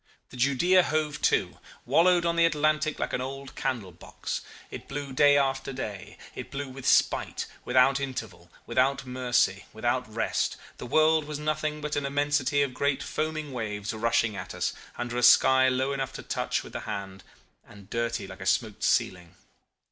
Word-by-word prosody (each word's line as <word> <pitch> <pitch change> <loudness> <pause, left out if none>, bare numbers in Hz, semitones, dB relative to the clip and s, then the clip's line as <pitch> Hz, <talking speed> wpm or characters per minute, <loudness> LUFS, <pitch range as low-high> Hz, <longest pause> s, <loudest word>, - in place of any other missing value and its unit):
The - - -11
Judea, 140 +9 +4
hove 155 -3 -1
to, - - -1 0.3
wallowed 175 0 +4
on 170 0 +1
the 170 0 +5
Atlantic 155 -1 +1
like - - -3
an 125 - -1
old 135 +1 -6
candlebox. 100 -9 -4 0.3
It - - -8
blew 140 -1 -5
day 145 +1 +5
after 135 -1 0
day: 105 -7 -6 0.2
it - - -7
blew 140 0 -5
with 130 0 -7
spite, - - +2 0.2
without 135 +2 +4
interval, 115 -10 -6 0.2
without 130 +3 +1
mercy, 125 -6 0
without 120 +1 -1
rest. 110 0 -1 0.2
The - - -6
world 155 +3 +3
was 150 -1 -5
nothing 150 0 -2
but 150 0 -3
an 145 -1 -1
immensity 145 0 +1
of 135 -2 -3
great 140 +1 0
foaming 155 -2 -3
waves 105 -4 -4
rushing 110 -1 +1
at - - -7
us, - - -1 0.2
under 120 0 -3
a - - 0
sky 130 +2 +6
low 130 +2 0
enough 135 -1 -3
to - - -8
touch - - -2
with - - -12
the - - -3
hand 95 -1 -6 0.4
and 100 -2 -15
dirty 115 -1 -2
like 95 0 -11
a 95 - -4
smoked 110 -1 0
ceiling. 90 -2 0
135 Hz, 170 wpm, -27 LUFS, 115-145 Hz, 0.4 s, sky